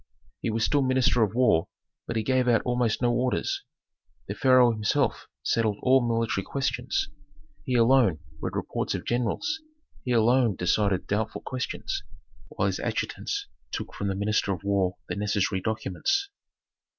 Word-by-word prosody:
He -, -, -1 dB
was 115 Hz, +1 st, +1 dB
still 145 Hz, -1 st, +2 dB
minister 130 Hz, -2 st, +2 dB
of 110 Hz, 0 st, +1 dB
war, 120 Hz, -10 st, +3 dB, 0.4 s
but 115 Hz, -, -3 dB
he 110 Hz, -, 0 dB
gave 130 Hz, +1 st, +2 dB
out 120 Hz, -2 st, +3 dB
almost 125 Hz, -1 st, 0 dB
no 120 Hz, 0 st, +3 dB
orders. 130 Hz, -, 0 dB, 0.7 s
The -, -, -3 dB
pharaoh 130 Hz, -2 st, +5 dB
himself 110 Hz, -2 st, 0 dB, 0.2 s
settled 110 Hz, -3 st, +1 dB
all 130 Hz, +1 st, +5 dB
military 115 Hz, -4 st, 0 dB
questions. 130 Hz, 0 st, -1 dB, 0.6 s
He 130 Hz, -, 0 dB
alone 115 Hz, -6 st, +4 dB, 0.2 s
read -, -, -3 dB
reports -, -, -2 dB
of -, -, -5 dB
generals; 125 Hz, -, -1 dB, 0.4 s
he 125 Hz, -, -2 dB
alone 120 Hz, -1 st, +3 dB
decided 95 Hz, +1 st, +1 dB
doubtful 105 Hz, +2 st, -2 dB
questions, 130 Hz, -, -3 dB, 0.5 s
while -, -, -2 dB
his -, -, 0 dB
adjutants 405 Hz, 0 st, -2 dB, 0.3 s
took -, -, -5 dB
from 100 Hz, -, -3 dB
the 95 Hz, -, -1 dB
minister 105 Hz, 0 st, 0 dB
of 95 Hz, 0 st, -4 dB
war 100 Hz, -2 st, +1 dB
the -, -, -3 dB
necessary 100 Hz, -2 st, 0 dB
documents. 110 Hz, -, -1 dB
115 Hz, 150 wpm, -27 LUFS, 105-130 Hz, 0.7 s, pharaoh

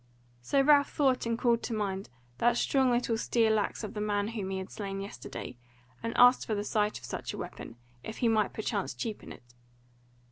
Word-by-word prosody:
So 125 Hz, -, +1 dB
Ralph 285 Hz, 0 st, +5 dB
thought 265 Hz, -5 st, +1 dB
and 230 Hz, 0 st, 0 dB
called 235 Hz, -1 st, +2 dB
to 230 Hz, -, -3 dB
mind 195 Hz, -2 st, -3 dB, 0.3 s
that 240 Hz, 0 st, +3 dB
strong 265 Hz, 0 st, +2 dB
little 240 Hz, -2 st, +1 dB
steel 220 Hz, -2 st, +2 dB
axe 205 Hz, -, -3 dB
of 210 Hz, -, -5 dB
the 210 Hz, -, -4 dB
man 205 Hz, 0 st, 0 dB
whom 210 Hz, -5 st, -4 dB
he 190 Hz, -, -2 dB
had 190 Hz, 0 st, -6 dB
slain 195 Hz, -2 st, -5 dB
yesterday, 195 Hz, -9 st, -7 dB, 0.4 s
and 230 Hz, -, -3 dB
asked 245 Hz, +1 st, +6 dB
for 220 Hz, -, 0 dB
the 205 Hz, -, -2 dB
sight 210 Hz, 0 st, 0 dB
of -, -, -10 dB
such -, -, -5 dB
a -, -, -6 dB
weapon, -, -, -7 dB, 0.3 s
if 220 Hz, -, -7 dB
he 240 Hz, -, +1 dB
might 220 Hz, -2 st, +2 dB
perchance 205 Hz, -, -3 dB
cheapen 210 Hz, -, -5 dB
it. -, -, -12 dB
220 Hz, 205 wpm, -30 LUFS, 205-240 Hz, 0.4 s, asked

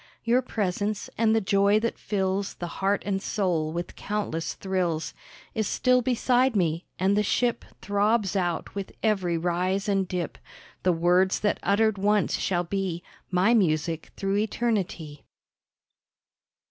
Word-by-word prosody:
Your 240 Hz, +2 st, +3 dB
presence, 205 Hz, -3 st, -2 dB
and 225 Hz, -1 st, +3 dB
the 225 Hz, -, +3 dB
joy 200 Hz, +1 st, +3 dB
that 230 Hz, +1 st, -2 dB
fills 195 Hz, -1 st, -1 dB
The 175 Hz, -, -5 dB, 0.2 s
heart 200 Hz, +1 st, +1 dB
and 195 Hz, -1 st, -1 dB
soul 175 Hz, -8 st, 0 dB
with 170 Hz, +2 st, -5 dB
countless 200 Hz, -6 st, -3 dB
thrills 180 Hz, -4 st, -2 dB, 0.4 s
Is 220 Hz, -2 st, -1 dB
still 255 Hz, 0 st, +3 dB
beside 250 Hz, +1 st, +2 dB
me, 170 Hz, -3 st, 0 dB
and 190 Hz, +2 st, +2 dB
the 210 Hz, -, +3 dB
ship 240 Hz, +3 st, 0 dB, 0.2 s
Throbs 205 Hz, 0 st, +1 dB
out 175 Hz, -3 st, -1 dB
with 200 Hz, -1 st, -5 dB
every 190 Hz, -6 st, +1 dB
rise 180 Hz, +4 st, 0 dB
and 195 Hz, -2 st, +1 dB
dip 175 Hz, -3 st, -4 dB, 0.4 s
The 185 Hz, -, +3 dB
words 180 Hz, +3 st, +2 dB
that 210 Hz, -, +1 dB
uttered 205 Hz, 0 st, +2 dB
once 205 Hz, +1 st, +2 dB
shall 175 Hz, -2 st, 0 dB
be 180 Hz, -1 st, -3 dB, 0.3 s
My 185 Hz, +5 st, +3 dB
music 165 Hz, -5 st, +1 dB
through 195 Hz, 0 st, 0 dB
eternity. 205 Hz, -9 st, -2 dB
195 Hz, 140 wpm, -26 LUFS, 175-210 Hz, 0.4 s, Your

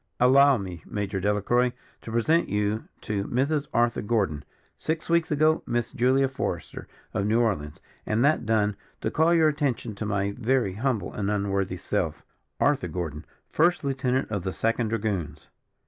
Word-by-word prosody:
Allow 135 Hz, +2 st, +6 dB
me, 90 Hz, -5 st, -6 dB
Major 100 Hz, -2 st, -3 dB
Delacroix, 105 Hz, +5 st, +1 dB, 0.3 s
to 115 Hz, -, -8 dB
present 155 Hz, +9 st, +2 dB
you 105 Hz, +1 st, -1 dB, 0.2 s
to 100 Hz, -2 st, -2 dB
Mrs. 140 Hz, +5 st, 0 dB
Arthur 120 Hz, 0 st, +2 dB
Gordon, 100 Hz, -10 st, 0 dB, 0.3 s
six 160 Hz, +1 st, -3 dB
weeks 170 Hz, -1 st, +3 dB
ago 155 Hz, +1 st, +3 dB
Miss 120 Hz, -1 st, -1 dB
Julia 130 Hz, +3 st, +3 dB
Forester, 130 Hz, -, -4 dB, 0.3 s
of 100 Hz, -, 0 dB
New 110 Hz, +2 st, +3 dB
Orleans; 90 Hz, -11 st, -1 dB, 0.2 s
and 110 Hz, +4 st, +1 dB
that 155 Hz, +2 st, +3 dB
done, 105 Hz, -2 st, +1 dB, 0.3 s
to -, -, -1 dB
call 160 Hz, +2 st, +3 dB
your 165 Hz, -2 st, +5 dB
attention 135 Hz, -7 st, -1 dB
to 105 Hz, +2 st, -5 dB
my 100 Hz, -1 st, 0 dB
very 125 Hz, -2 st, 0 dB
humble 115 Hz, +1 st, -1 dB
and 100 Hz, -1 st, -2 dB
unworthy 100 Hz, -2 st, -1 dB
self, -, -, -2 dB, 0.3 s
Arthur 140 Hz, -10 st, +2 dB
Gordon, 80 Hz, -3 st, -5 dB, 0.2 s
First 170 Hz, +2 st, +2 dB
Lieutenant 135 Hz, -2 st, -1 dB
of 100 Hz, -3 st, -1 dB
the 95 Hz, -1 st, -3 dB
Second 115 Hz, +6 st, 0 dB
Dragoons." 95 Hz, -10 st, -3 dB
115 Hz, 160 wpm, -26 LUFS, 100-135 Hz, 0.3 s, Allow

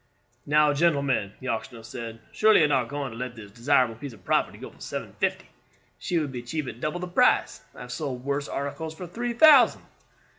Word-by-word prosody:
"Now, 150 Hz, 0 st, +4 dB
gentlemen," 140 Hz, -9 st, +1 dB
the 130 Hz, -, -5 dB
auctioneer 115 Hz, 0 st, -4 dB
said, 115 Hz, -1 st, -8 dB
"surely 215 Hz, 0 st, +5 dB
you -, -, +6 dB
are -, -, 0 dB
not 130 Hz, -5 st, +2 dB
going 145 Hz, -3 st, -4 dB
to 110 Hz, -, -9 dB
let 125 Hz, -1 st, -5 dB
this 105 Hz, -3 st, -11 dB
desirable 125 Hz, +1 st, +2 dB
piece 125 Hz, +3 st, -8 dB
of 95 Hz, -5 st, -18 dB
property -, -, +1 dB
go -, -, -9 dB
for -, -, -22 dB
seven -, -, -6 dB
fifty? -, -, -1 dB, 0.5 s
She 175 Hz, -, -1 dB
would 150 Hz, -4 st, -1 dB
be 125 Hz, -2 st, -5 dB
cheap 150 Hz, +5 st, -4 dB
at 120 Hz, -2 st, -7 dB
double 155 Hz, +4 st, -2 dB
the 180 Hz, -, -4 dB
price. 175 Hz, -, +2 dB
I -, -, -11 dB
have 125 Hz, 0 st, -8 dB
sold 130 Hz, -4 st, -4 dB
worse 140 Hz, 0 st, -1 dB
articles 155 Hz, +3 st, -4 dB
for 180 Hz, -, -7 dB
three 235 Hz, +7 st, -4 dB
thousand." 285 Hz, 0 st, +6 dB
140 Hz, 215 wpm, -26 LUFS, 120-160 Hz, 0.5 s, you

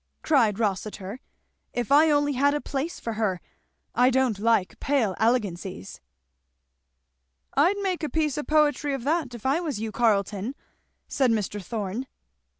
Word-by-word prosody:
cried 235 Hz, -10 st, +3 dB
Rossitur, 205 Hz, 0 st, -3 dB, 0.5 s
"if 245 Hz, +1 st, -3 dB
I 305 Hz, +3 st, +6 dB
only 290 Hz, -1 st, +2 dB
had 285 Hz, +3 st, +2 dB
a -, -, 0 dB
place 290 Hz, +4 st, -4 dB
for 230 Hz, -, -4 dB
her. 210 Hz, -5 st, -1 dB, 0.5 s
I 250 Hz, +1 st, +4 dB
don't 260 Hz, -5 st, +1 dB
like 225 Hz, -3 st, +1 dB
pale 245 Hz, -9 st, +1 dB
elegancies." 200 Hz, -, -1 dB, 1.5 s
"I'd 345 Hz, +9 st, +3 dB
make 370 Hz, -3 st, -1 dB
a 305 Hz, -, -2 dB
piece 305 Hz, -3 st, 0 dB
of 295 Hz, -, -4 dB
poetry 295 Hz, -2 st, +2 dB
of 260 Hz, -, -6 dB
that 290 Hz, -3 st, 0 dB
if 235 Hz, -, -11 dB
I 275 Hz, +5 st, +2 dB
was 305 Hz, -11 st, -3 dB
you, 220 Hz, 0 st, -3 dB
Carleton," 210 Hz, +1 st, 0 dB, 0.5 s
said 265 Hz, -3 st, +1 dB
Mr. 210 Hz, -2 st, -1 dB
Thorn. 220 Hz, +4 st, -4 dB
245 Hz, 150 wpm, -26 LUFS, 210-290 Hz, 1.5 s, I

